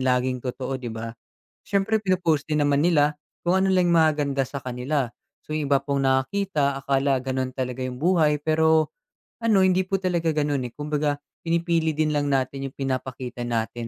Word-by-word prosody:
laging 125 0 +1
totoo 130 +1 -4
'di 120 - -5
ba? 115 0 -6 0.6
Siyempre 205 +2 +1
pinopost 180 -7 +1
din 150 -1 +1
naman 145 0 +3
nila 150 -2 +2 0.2
kung 180 +2 +3
ano 190 - +2
lang 180 -2 +3
'yung 170 - +4
maganda 145 -4 +1
sa 140 - -7
kanila. 125 +1 -1 0.3
So 155 - -7
'yung 155 -2 -1
iba 140 - +5
pong 140 -1 -1
nakakita 140 0 0
akala 135 0 +2
ganun 130 0 -2
talaga 130 0 -3
'yung 125 0 -5
buhay, 155 -3 +3
pero, 160 +1 +3 0.5
ano 220 -4 +3
hindi 185 0 +3
po 195 - 0
talaga 175 -3 0
ganun, 145 -4 0
eh. 120 - -13
Kumbaga 150 0 -1 0.3
pinipili 165 -2 +1
din 155 0 +1
lang 145 -1 0
natin 135 0 -1
'yung 135 - -12
pinapakita 130 -2 -4
natin. 115 0 -2
145 Hz, 175 wpm, -24 LUFS, 130-165 Hz, 0.6 s, iba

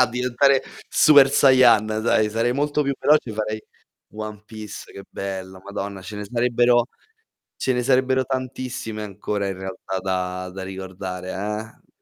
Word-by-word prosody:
a 125 - +6
diventare 125 +2 +2 0.3
Super 140 -3 +6
Sayan, 130 -6 +6
dai, 110 0 +1
sarei 115 +2 +1
molto 145 +2 0
più 140 -1 -1
veloce 150 -6 +3
e - - -5
farei 110 0 -3 0.5
One 105 -1 -7
Piece, 110 -2 -9
che 100 - -10
bello, 95 -1 -6
madonna, 100 -1 -5
ce 100 +3 -8
ne 105 - -5
sarebbero 120 +1 +2 0.7
ce 130 - 0
ne 125 0 0
sarebbero 130 0 +2
tantissime 130 -4 -4
ancora 100 0 -3
in 95 - -4
realtà 95 0 -5
da 90 -1 -3
da 95 0 -7
ricordare, 95 -1 -6 0.6
eh. - - -42
110 Hz, 150 wpm, -23 LUFS, 95-125 Hz, 0.7 s, a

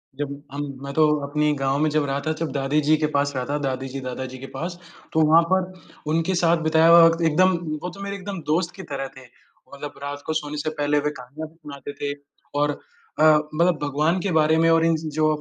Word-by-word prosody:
जब 140 0 -5
हम 145 +1 -4 0.2
मैं 140 - -5
तो 155 +1 +4 0.2
अपनी 150 +1 +1
गाँव 135 0 0
में 155 +1 +2
जब 150 -1 +1
रहा 140 0 -1
था - - +2
जब 165 - -1
दादीजी 145 +3 +2
के 155 - +1
पास 140 0 +1
रहा 125 -1 -2
था, 145 +1 -1
दादीजी-दादाजी 130 -1 -4
के 135 - -8
पास, 175 +2 -5 0.3
तो 160 - +3
वहाँ 160 +2 +7
पर 185 0 +1 0.4
उनके 165 +3 +1
साथ 170 0 +3
बिताया 160 +1 +5
हुआ 170 0 +9
वक़्त 165 0 +3
एकदम 185 +3 +3 0.3
वो 180 - -2
तो 200 - -10
मेरे 200 0 -4
एकदम 200 -1 -6
दोस्त 170 +2 +1
की 190 - -8
तरह 135 -1 -3
थे। 130 - -10
वो 130 +2 -20
मतलब 145 +1 -7
रात 145 0 -5
को 160 - -1
सोने 150 -1 -3
से 150 +1 -2
पहले 150 -1 0
वे 150 +1 0
कहानियाँ 145 +6 -8
भी 165 - -25
सुनाते 145 -3 -9
थे 145 0 -1 0.5
और 145 0 0 0.4
अ, 155 - +4 0.3
मतलब 170 +1 +3
भगवान 150 +5 +1
के 200 - -1
बारे 160 -1 +3
में 165 0 +4
और 165 0 +4
इन 165 -1 +3 0.2
जो 155 +1 +2
150 Hz, 225 wpm, -23 LUFS, 140-165 Hz, 0.5 s, हुआ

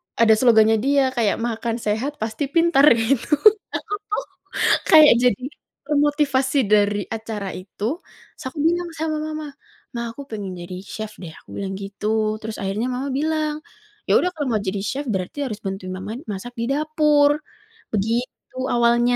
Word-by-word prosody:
ada 225 -1 +5
slogannya 220 -2 +5
dia, 275 0 +2
kayak, 235 -5 +1
"makan 230 0 -2
sehat 230 +6 -2
pasti 220 +6 -2
pintar" 330 -2 +4
gitu. 240 +6 +1 0.4
Aku - - -4
tuh 420 - -2 0.7
kayak 310 -4 +9
jadi 245 -2 +2 0.5
termotivasi 285 -2 +2
dari 205 0 +3
acara 220 -3 -5
itu, 185 +2 -10 0.5
terus - - -12
aku 305 - -9
bilang 345 +1 0
sama 315 -1 -1
mama. 310 0 -5 0.5
"Ma, 235 -1 -3
aku 235 - -10
pengen 205 -4 -5
jadi 180 +1 -7
chef 215 +1 -7
deh," 170 -3 -7
aku - - -18
bilang 195 -1 -3
gitu. 215 +2 -1
Terus 220 0 -6
akhirnya 200 +5 -1
mama 255 +2 -3
bilang, 305 +1 -1 0.4
"Ya - - +5
udah 360 - +1
kalau 295 -3 -2
mau - - -3
jadi 195 +1 -3
chef 275 +8 -3
berarti 215 +8 -2
harus 215 -4 -5
bantuin 190 -1 -5
mama 190 +3 -6 0.2
masak 210 +4 -6
di 230 - 0
dapur," 300 0 +3 0.5
begitu 230 +5 -2
awalnya. 240 0 +3
235 Hz, 155 wpm, -22 LUFS, 210-290 Hz, 0.7 s, kayak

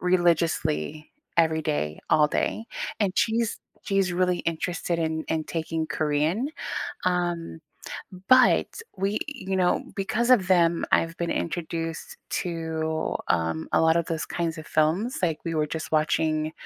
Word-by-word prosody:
religiously, 165 - +1 0.3
every 160 -1 +3
day, 75 - -1
all 150 -1 +6
day. 220 - -1 0.4
And 195 -3 +2
she's 230 0 +1 0.2
she's 195 -2 +1
really 180 0 +1
interested 170 +1 -2
in 160 -1 -1
in 160 -1 0
taking 160 0 -2
Korean, 155 - 0 0.6
um, 175 -2 -1 0.7
but 255 -1 +6 0.3
we 195 +2 0
you 195 -10 -4
know, 180 -1 +2
because 215 +5 0
of 200 -7 +5
them, 170 -2 +3
I've 165 0 +2
been 170 -1 -2
introduced 165 -1 -3
to, 160 -2 -2
um, 80 -2 0
a - - +5
lot 160 0 +4
of 170 - 0
those 165 -1 -2
kinds 165 -1 -2
of 155 - -8
films, 170 +11 +1
like, 165 -4 +1
we 165 - -1
were 150 -1 +1
just 160 0 -5
watching 155 0 +1
165 Hz, 140 wpm, -26 LUFS, 160-180 Hz, 0.7 s, all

